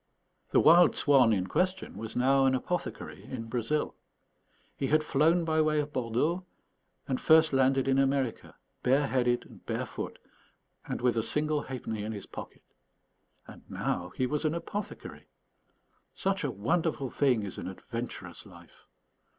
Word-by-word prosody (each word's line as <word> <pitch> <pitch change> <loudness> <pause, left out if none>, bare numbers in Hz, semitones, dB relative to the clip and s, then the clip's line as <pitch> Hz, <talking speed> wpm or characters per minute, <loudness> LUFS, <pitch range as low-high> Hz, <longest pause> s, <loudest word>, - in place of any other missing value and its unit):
The - - +4
wild 170 +2 +6
swan 135 -5 +4
in 95 -4 +1
question 185 - -1
was 110 0 -6
now 135 +2 +4
an 130 - +3
apothecary 180 +7 -4
in 125 -3 -6
Brazil. 120 +6 -1 0.8
He 135 - -2
had 155 +2 +3
flown 160 +4 +2
by 160 -1 +2
way 155 -1 +2
of 150 0 -3
Bordeaux, 130 +9 0 0.6
and 130 - -2
first 160 -1 +5
landed 135 0 +3
in 135 0 +3
America, 135 -3 0 0.3
bare 135 +3 +3
headed 125 -2 +1
and - - -16
barefoot, - - -4 0.7
and - - -4
with 120 -2 +2
a - - +3
single 150 +4 0
halfpenny 115 -5 -5
in 110 +1 -4
his 100 - -7
pocket. - - -10 0.8
And - - -13
now 90 0 -2
he 130 - 0
was 150 +3 -2
an 155 +1 0
apothecary! 205 +4 -6 0.9
Such 195 -1 -1
a 145 - 0
wonderful 135 - -1
thing 125 -6 +2
is 100 - -6
an - - -5
adventurous 95 -2 -7
life! - - -17
135 Hz, 150 wpm, -29 LUFS, 120-155 Hz, 0.9 s, wild